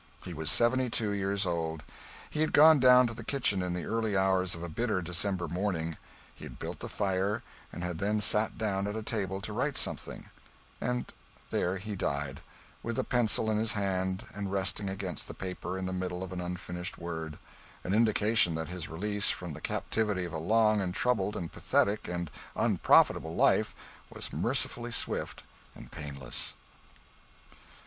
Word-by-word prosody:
He 90 Hz, -, -5 dB
was 80 Hz, -1 st, -1 dB
seventy 125 Hz, +5 st, +3 dB
two 110 Hz, -2 st, 0 dB
years 100 Hz, 0 st, 0 dB
old. 80 Hz, -2 st, -2 dB, 0.4 s
He 155 Hz, -, -3 dB
had 155 Hz, -, +1 dB
gone 155 Hz, 0 st, +8 dB
down 125 Hz, 0 st, +7 dB
to 115 Hz, -, -2 dB
the -, -, -8 dB
kitchen 125 Hz, -9 st, +2 dB
in 90 Hz, -1 st, -2 dB
the 90 Hz, -, -4 dB
early 110 Hz, -3 st, 0 dB
hours 95 Hz, -2 st, +2 dB
of 85 Hz, -, -7 dB
a -, -, -3 dB
bitter 105 Hz, +4 st, -1 dB
December 90 Hz, +1 st, -1 dB
morning; 85 Hz, -2 st, -2 dB, 0.4 s
he -, -, -14 dB
had -, -, -8 dB
built -, -, -6 dB
the -, -, -6 dB
fire, 100 Hz, +3 st, 0 dB, 0.3 s
and 85 Hz, -, -6 dB
had 90 Hz, -2 st, -3 dB
then 105 Hz, +2 st, +1 dB
sat 105 Hz, +1 st, +3 dB
down 100 Hz, -3 st, -1 dB
at 105 Hz, -, -3 dB
a 110 Hz, -, -3 dB
table 100 Hz, -3 st, -2 dB
to 105 Hz, +1 st, -5 dB
write 130 Hz, +5 st, 0 dB
something; -, -, -1 dB, 0.5 s
and 125 Hz, 0 st, -2 dB, 0.4 s
there 90 Hz, +2 st, 0 dB
he 105 Hz, +2 st, -5 dB
died, 70 Hz, -5 st, -2 dB, 0.4 s
with 115 Hz, 0 st, -3 dB
the -, -, 0 dB
pencil 110 Hz, -2 st, +4 dB
in 105 Hz, -, +1 dB
his 110 Hz, 0 st, +2 dB
hand 95 Hz, -2 st, -1 dB
and 100 Hz, -1 st, -4 dB
resting 95 Hz, +1 st, 0 dB
against 95 Hz, -, -3 dB
the -, -, -8 dB
paper 90 Hz, 0 st, -5 dB
in 95 Hz, -, -3 dB
the 95 Hz, -, -3 dB
middle 90 Hz, 0 st, -3 dB
of 95 Hz, 0 st, -6 dB
an 90 Hz, -, -3 dB
unfinished 90 Hz, 0 st, -4 dB
word 80 Hz, -2 st, -5 dB, 0.5 s
an 95 Hz, -, -1 dB
indication 110 Hz, -4 st, +3 dB
that 80 Hz, +1 st, -3 dB
his 90 Hz, -3 st, -5 dB
release 105 Hz, +5 st, 0 dB
from 90 Hz, -3 st, -3 dB
the -, -, -9 dB
captivity 105 Hz, -5 st, -1 dB
of 85 Hz, -, -7 dB
a 80 Hz, -, -2 dB
long 110 Hz, +4 st, +3 dB
and 90 Hz, -1 st, -2 dB
troubled 105 Hz, -4 st, +1 dB
and 85 Hz, -2 st, -4 dB
pathetic 105 Hz, +1 st, +1 dB
and 85 Hz, -3 st, -3 dB, 0.2 s
unprofitable 80 Hz, +1 st, +3 dB
life -, -, +3 dB, 0.3 s
was -, -, -6 dB
mercifully 120 Hz, 0 st, 0 dB
swift -, -, -2 dB, 0.3 s
and -, -, -12 dB
painless. 70 Hz, -5 st, -4 dB
95 Hz, 180 wpm, -30 LUFS, 90-110 Hz, 0.5 s, gone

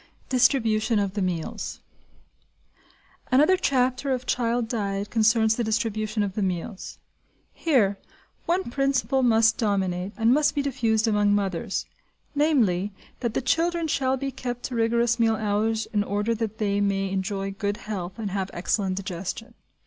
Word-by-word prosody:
DISTRIBUTION 230 Hz, -4 st, +3 dB
OF 200 Hz, -2 st, 0 dB
THE 205 Hz, -, -2 dB
MEALS 175 Hz, -4 st, -3 dB, 1.5 s
Another 300 Hz, +8 st, +5 dB
chapter 260 Hz, -5 st, +1 dB
of 255 Hz, -1 st, -1 dB
child 240 Hz, -1 st, 0 dB
diet 200 Hz, -3 st, -2 dB
concerns 220 Hz, 0 st, +3 dB
the 240 Hz, -, 0 dB
distribution 215 Hz, -1 st, -1 dB
of 200 Hz, -2 st, -3 dB
the 210 Hz, -, -2 dB
meals. 185 Hz, +2 st, -4 dB, 0.6 s
Here, 215 Hz, -11 st, +2 dB, 0.5 s
one 350 Hz, -6 st, 0 dB
principle 275 Hz, 0 st, +1 dB
must 225 Hz, -2 st, +4 dB
dominate, 195 Hz, -3 st, -1 dB
and 225 Hz, +2 st, +4 dB
must 300 Hz, +2 st, +2 dB
be 285 Hz, -, +1 dB
diffused, 230 Hz, -5 st, +1 dB
among 205 Hz, -1 st, +3 dB
mothers, 195 Hz, +1 st, -2 dB, 0.5 s
namely, 230 Hz, -, +2 dB, 0.3 s
that 235 Hz, -3 st, -2 dB
the -, -, 0 dB
children 335 Hz, +4 st, +1 dB
shall 265 Hz, -3 st, +1 dB
be 275 Hz, +1 st, -3 dB
kept 245 Hz, -2 st, -5 dB
to 255 Hz, -, -4 dB
rigorous 235 Hz, +1 st, +2 dB
meal 225 Hz, -1 st, +3 dB
hours 220 Hz, +1 st, 0 dB
in 205 Hz, -1 st, +2 dB
order 205 Hz, +3 st, -1 dB
that 220 Hz, -1 st, -3 dB
they 205 Hz, -2 st, 0 dB
may 195 Hz, -1 st, 0 dB
enjoy 195 Hz, 0 st, -2 dB
good 205 Hz, +1 st, -2 dB
health 185 Hz, -4 st, -5 dB
and 210 Hz, -4 st, -4 dB
have 195 Hz, -1 st, -2 dB
excellent 190 Hz, +2 st, 0 dB
digestion. 195 Hz, +5 st, -5 dB
220 Hz, 150 wpm, -25 LUFS, 200-250 Hz, 1.5 s, Another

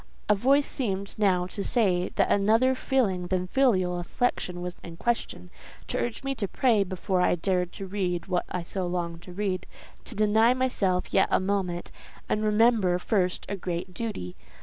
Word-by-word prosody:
A 210 Hz, -, +5 dB
voice 275 Hz, +7 st, +3 dB
seemed 200 Hz, -6 st, -3 dB
now 185 Hz, -4 st, +3 dB
to 200 Hz, +2 st, -5 dB
say 185 Hz, -7 st, +2 dB
that -, -, +2 dB
another 225 Hz, +6 st, +4 dB
feeling 215 Hz, -10 st, 0 dB
than 185 Hz, 0 st, 0 dB
filial 185 Hz, -6 st, +2 dB
affection 180 Hz, -2 st, -1 dB
was 180 Hz, 0 st, -4 dB
in 165 Hz, -1 st, -9 dB
question—to 215 Hz, -, -4 dB
urge 240 Hz, +2 st, -2 dB
me 275 Hz, 0 st, -1 dB
to 220 Hz, -6 st, -3 dB
pray 225 Hz, -1 st, +2 dB
before 185 Hz, 0 st, -1 dB
I 180 Hz, -, +3 dB
dared 180 Hz, 0 st, 0 dB
to 195 Hz, -, -6 dB
read 185 Hz, -3 st, -2 dB
what 180 Hz, -2 st, -1 dB
I 180 Hz, -, -3 dB
so 185 Hz, +1 st, -3 dB
longed 170 Hz, -1 st, -3 dB
to 180 Hz, -, -11 dB
read—to 190 Hz, +4 st, -5 dB
deny 220 Hz, +3 st, +4 dB
myself 200 Hz, -8 st, 0 dB
yet -, -, +4 dB
a -, -, +4 dB
moment, 185 Hz, -3 st, -2 dB, 0.4 s
and 215 Hz, -, 0 dB
remember 215 Hz, -4 st, +3 dB
first 180 Hz, -1 st, 0 dB
a 200 Hz, -, -3 dB
great 180 Hz, 0 st, -4 dB
duty. 180 Hz, -, -5 dB
195 Hz, 170 wpm, -27 LUFS, 180-220 Hz, 0.4 s, A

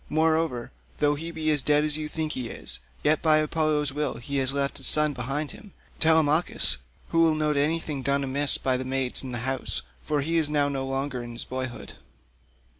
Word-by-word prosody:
Moreover, 160 Hz, -5 st, +1 dB, 0.3 s
though 145 Hz, 0 st, +3 dB
he 160 Hz, +3 st, -5 dB
be 155 Hz, -2 st, 0 dB
dead 145 Hz, +1 st, +3 dB
as 150 Hz, -1 st, +2 dB
you 155 Hz, 0 st, -2 dB
think 155 Hz, 0 st, -3 dB
he 125 Hz, -4 st, -3 dB
is, -, -, -4 dB, 0.2 s
yet 150 Hz, +1 st, +3 dB
by 155 Hz, -1 st, +5 dB
Apollo's 155 Hz, -2 st, +1 dB
will 150 Hz, -1 st, -1 dB
he 140 Hz, +3 st, -4 dB
has 135 Hz, -1 st, +2 dB
left 140 Hz, 0 st, -2 dB
a -, -, -12 dB
son 150 Hz, -1 st, +3 dB
behind 135 Hz, +4 st, -3 dB
him, 210 Hz, -5 st, -13 dB, 0.3 s
Telemachus, 160 Hz, -, +3 dB, 0.3 s
who 165 Hz, -, +1 dB
will 165 Hz, -1 st, +5 dB
note 150 Hz, -1 st, +1 dB
anything 150 Hz, 0 st, 0 dB
done 140 Hz, +1 st, +1 dB
amiss 140 Hz, +1 st, +2 dB
by 130 Hz, -1 st, 0 dB
the 130 Hz, -, -3 dB
maids 130 Hz, -1 st, +1 dB
in 130 Hz, -, -6 dB
the 120 Hz, -, -3 dB
house, 135 Hz, 0 st, -1 dB, 0.2 s
for 145 Hz, -, -1 dB
he 165 Hz, +4 st, 0 dB
is 155 Hz, -3 st, +4 dB
now 145 Hz, -1 st, +2 dB
no 135 Hz, -1 st, -3 dB
longer 135 Hz, -1 st, -2 dB
in 120 Hz, 0 st, -7 dB
his 115 Hz, -, -6 dB
boyhood." 130 Hz, -1 st, -5 dB
145 Hz, 200 wpm, -26 LUFS, 135-155 Hz, 0.3 s, by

